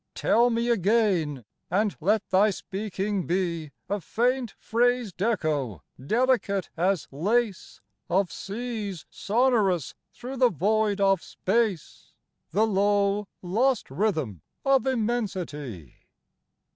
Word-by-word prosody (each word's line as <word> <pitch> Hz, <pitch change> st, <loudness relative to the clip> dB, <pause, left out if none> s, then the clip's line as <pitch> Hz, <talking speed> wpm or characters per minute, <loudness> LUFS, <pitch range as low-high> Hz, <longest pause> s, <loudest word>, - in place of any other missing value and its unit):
Tell 240 Hz, +1 st, +3 dB
me 235 Hz, 0 st, 0 dB
again, 190 Hz, -, +1 dB, 0.2 s
and 205 Hz, +3 st, +1 dB
let 205 Hz, +6 st, +1 dB
thy 195 Hz, +3 st, +5 dB
speaking 200 Hz, 0 st, -3 dB
be 170 Hz, -3 st, -1 dB, 0.2 s
A 205 Hz, -1 st, -2 dB
faint 245 Hz, +5 st, 0 dB
phrased 240 Hz, -4 st, 0 dB
echo, 150 Hz, -, -1 dB, 0.2 s
delicate 225 Hz, -, +1 dB
as 175 Hz, -2 st, 0 dB
lace, 205 Hz, -, -1 dB, 0.3 s
Of 185 Hz, 0 st, +1 dB
seas 210 Hz, -4 st, -5 dB
sonorous 210 Hz, -, +1 dB, 0.2 s
through 260 Hz, +2 st, -7 dB
the 250 Hz, -1 st, +5 dB
void 210 Hz, -, +1 dB
of 195 Hz, -2 st, +3 dB
space, 205 Hz, -4 st, -2 dB, 0.3 s
The 210 Hz, +6 st, +2 dB
low, 205 Hz, 0 st, +1 dB, 0.2 s
lost 235 Hz, -, +1 dB
rhythm 150 Hz, -, -1 dB, 0.2 s
of 270 Hz, -1 st, +3 dB
immensity. 185 Hz, -, -3 dB
205 Hz, 105 wpm, -26 LUFS, 175-230 Hz, 0.3 s, thy